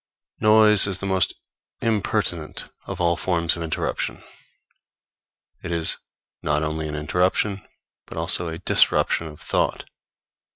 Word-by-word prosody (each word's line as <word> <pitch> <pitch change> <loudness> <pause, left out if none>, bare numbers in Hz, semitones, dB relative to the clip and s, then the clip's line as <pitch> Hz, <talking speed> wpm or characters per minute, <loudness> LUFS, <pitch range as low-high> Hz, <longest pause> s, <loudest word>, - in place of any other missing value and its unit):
Noise 105 -1 +6
is 95 -2 +2
the 100 - -6
most 95 -3 +1 0.4
impertinent 105 -7 -2 0.2
of - - -6
all 85 -1 +2
forms 85 +1 0
of 85 - -7
interruption. 80 -1 -3 1.4
It 85 - -6
is 85 -1 +3 0.4
not 75 +1 0
only 80 0 -3
an 75 - -5
interruption, 90 +6 0 0.5
but - - -10
also 85 +1 -1
a 80 0 -5
disruption 85 - +2
of 75 -1 -12
thought. - - -1
85 Hz, 125 wpm, -23 LUFS, 80-100 Hz, 1.4 s, Noise